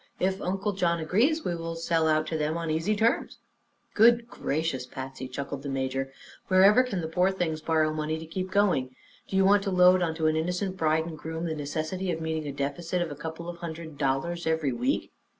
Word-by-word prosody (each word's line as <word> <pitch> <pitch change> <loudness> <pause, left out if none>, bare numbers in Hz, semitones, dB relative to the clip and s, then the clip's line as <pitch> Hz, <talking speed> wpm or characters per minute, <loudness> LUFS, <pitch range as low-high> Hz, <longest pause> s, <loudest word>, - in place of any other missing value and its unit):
If 190 +1 0
Uncle 195 +3 -1
John 170 -3 +1
agrees, 235 - +1
we 175 - 0
will 165 0 -5
sell 165 -1 +1
out 155 0 +2
to 160 - -3
them 155 +1 -1
on 165 -1 -2
'easy 165 +7 +1
terms.'" 225 +4 +1 0.6
"Good 235 +2 +5
gracious, 145 - -2
Patsy!" 130 0 -7
chuckled 140 +1 -5
the 140 - -5
major, 135 0 -2 0.4
"wherever 195 +5 +6
can 210 -8 -2
the 160 - -3
poor 180 +3 +2
things 170 -5 -2
borrow 155 -1 +1
money 155 0 -2
to 160 - -7
keep 185 +3 -4
going? 180 -11 +1 0.3
Do - - -5
you 190 0 +4
want 200 +1 +5
to - - 0
load 180 0 +5
onto 160 -2 -1
an 155 0 +3
innocent 180 +4 -1
bride 160 -2 +1
an' 165 - -6
groom 160 +2 -5
the 160 - -1
necessity 155 +5 -3
of 165 - -3
meeting 160 -1 -3
a - - -2
deficit 145 +6 -2
of 165 - -6
a - - -5
couple 160 +3 -7
of 175 0 -6
hundred 160 -3 -7
dollars 150 +5 -1
every 160 -5 +1
week?" 260 - -1
165 Hz, 210 wpm, -27 LUFS, 155-185 Hz, 0.6 s, wherever